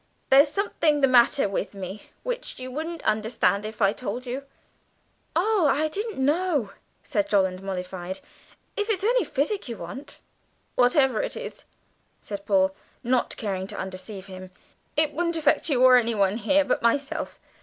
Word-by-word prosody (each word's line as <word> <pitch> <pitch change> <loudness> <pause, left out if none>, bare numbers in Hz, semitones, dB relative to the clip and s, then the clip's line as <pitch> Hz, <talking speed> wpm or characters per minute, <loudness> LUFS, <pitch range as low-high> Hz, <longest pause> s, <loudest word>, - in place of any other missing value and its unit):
There's 280 +2 +7
something 320 -6 +1
the 270 - +6
matter 250 0 +5
with 200 +1 -3
me 195 +1 -7
which - - -4
you 255 0 -6
wouldn't 320 +4 -5
understand 215 -2 +1
if 215 0 -3
I 195 +1 +4
told 245 +2 -5
you." 260 +3 -5 0.9
"Oh, 380 -1 +3
I 305 +3 +1
didn't 420 +6 -4
know," 290 - +1 0.3
said 300 0 -1
Jolland, 190 -2 +2
mollified; 185 -1 -5 0.6
"if 415 +1 -2
it's 395 -3 0
only 485 +3 +3
physic 295 - -1
you 230 - -5
want." 270 +2 -8 0.5
"Whatever 265 - +3
it - - -3
is," - - -8 0.5
said 200 -1 -7
Paul, 190 -1 +3 0.3
not 250 0 0
caring 190 -3 -3
to - - -6
undeceive 190 +1 -6
him, 185 -1 -9 0.5
"it 305 -1 +3
won't 335 +1 0
affect 310 +1 +2
you 255 -4 +3
or 255 -1 +8
anyone 215 -4 +2
here, 285 +6 +3
but 255 - 0
myself. 275 +6 0
255 Hz, 155 wpm, -25 LUFS, 200-310 Hz, 0.9 s, or